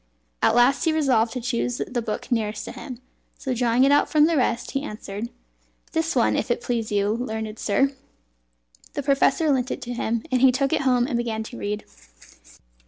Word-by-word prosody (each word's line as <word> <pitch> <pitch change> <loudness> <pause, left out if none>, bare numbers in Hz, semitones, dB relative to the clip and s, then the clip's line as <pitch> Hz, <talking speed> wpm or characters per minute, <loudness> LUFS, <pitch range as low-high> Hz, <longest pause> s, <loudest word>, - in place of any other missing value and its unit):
At - - +4
last 245 +6 +4
he 325 - +3
resolved 260 -8 +2
to 255 - -3
choose 245 0 -2
the 245 -1 -3
book 220 +3 -5
nearest 215 -3 -1
to - - -6
him; 250 0 -8 0.4
so 260 - -3
drawing 245 +1 +2
it 275 - +5
out 290 - +4
from 300 -1 +5
the 330 +1 +2
rest, 250 -3 0
he 275 - -1
answered 215 -3 -6 0.6
"This 325 -1 -1
one, 240 - +3
if - - -1
it 240 - +1
please 230 -3 -2
you, 205 0 +1
learned 220 -2 -4
sir." 270 +6 +2 1.0
The 285 - -3
professor 280 +3 +3
lent 255 -2 +1
it - - -3
to 245 0 -5
him, 235 -1 -1
and 255 -1 +2
he 265 -1 +7
took 275 +2 0
it - - +2
home 250 -3 +3
and 250 -3 -1
began 225 -2 -2
to 240 +2 -9
read. 210 +1 -3
245 Hz, 200 wpm, -24 LUFS, 225-270 Hz, 1.0 s, he